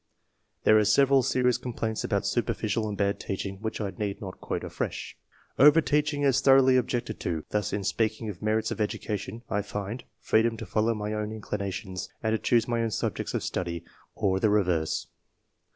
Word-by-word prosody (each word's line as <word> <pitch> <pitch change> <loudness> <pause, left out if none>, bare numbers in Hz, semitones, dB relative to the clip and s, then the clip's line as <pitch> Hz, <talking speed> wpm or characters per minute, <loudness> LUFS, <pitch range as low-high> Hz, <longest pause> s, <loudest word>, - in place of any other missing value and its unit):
There 110 - +6
are - - +4
several 135 +5 +5
serious 125 0 +2
complaints 115 -3 -3
about - - 0
superficial 110 -2 0
and 100 - -4
bad 100 0 0
teaching 95 0 -4
which 110 - -3
I 100 -3 -2
need 100 -2 -4
not 95 -3 -8
quote - - -3
afresh. - - -4 0.4
Overteaching 150 0 +4
is 135 -1 +3
thoroughly 135 -1 +6
objected 120 -3 -1
to; 80 -3 -3
thus, 105 -1 0
in 100 - -2
speaking 110 +2 0
of 100 -5 -6
merits 110 +1 0
of - - -3
education, 105 +1 -3
I 105 -1 0
find: 105 +3 -5
— - - -49
" - - -49
Freedom 115 +1 +3
to - - -6
follow 110 +1 +1
my 105 0 -3
own 105 0 -2
inclinations, 100 -3 -4
and 110 0 +1
to 110 - +1
choose 120 -2 +2
my 120 -1 0
own 115 - 0
subjects 105 - -2
of - - -1
study, 85 -2 -3 0.3
or 95 -3 +1
the 110 - +3
reverse." 90 -6 +1
110 Hz, 185 wpm, -27 LUFS, 100-120 Hz, 0.4 s, There